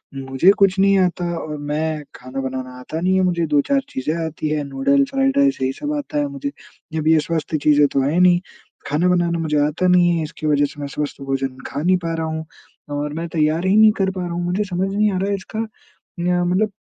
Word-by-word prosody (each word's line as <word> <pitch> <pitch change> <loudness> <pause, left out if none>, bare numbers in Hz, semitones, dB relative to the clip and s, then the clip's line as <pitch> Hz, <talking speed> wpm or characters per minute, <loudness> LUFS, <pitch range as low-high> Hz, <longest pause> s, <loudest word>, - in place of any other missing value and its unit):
मुझे 135 +6 +3
कुछ 195 -1 +4
नहीं 195 0 +5
आता 180 -1 0
और 150 -1 -5
मैं 155 0 -1
खाना 130 +2 -6
बनाना 130 -1 -5
आता 155 +5 -5
नहीं 185 +2 +2
है 190 - +3
मुझे 170 -2 +1
2-4 150 - +2
चीजें 130 +4 -2
आती 155 -1 -4
हैं 150 -1 -1
नूडल्स, 205 - +1
फ्राइड 270 0 +1
राइस 280 - +3
यही 130 0 +1
सब 295 0 -2
आता 295 +1 -4
है 290 0 +1
मुझे। 280 0 -5 0.4
जब 155 -1 -2
ये 160 0 +5
स्वस्थ 160 -2 -2
चीज़ें 150 -1 +5
तो 135 0 0
हैं 145 +6 +1
नहीं, 180 -1 +5 0.5
खाना 150 +5 +1
बनाना 175 -1 +1
मुझे 155 -2 0
आता 165 +5 0
नहीं 175 -1 +4
है 160 - -1
इसकी 155 0 -5
वजह 145 -1 +3
से 145 - -9
मैं 145 - -3
स्वस्थ 145 0 -5
भोजन 135 -1 -2
खा 140 - -4
नहीं 185 +3 +3
पा 165 -2 -4
रहा 160 0 -2
हूँ। 160 0 -4 0.5
और 145 0 -3
मैं 165 +2 -4
तैयार 160 +2 +1
ही 190 - +3
नहीं 215 0 +7
कर 195 -1 +1
पा 185 -1 -5
रहा 175 - -3
हूँ 175 +1 -2
मुझे 180 +4 0
समझ 185 0 -1
नहीं 210 +1 +2
आ - - -1
रहा 195 +2 -1
है 200 - +1
इसका 200 +3 -7 0.6
न्य 175 0 +1
मतलब 185 +5 +1
170 Hz, 235 wpm, -20 LUFS, 150-185 Hz, 0.6 s, नहीं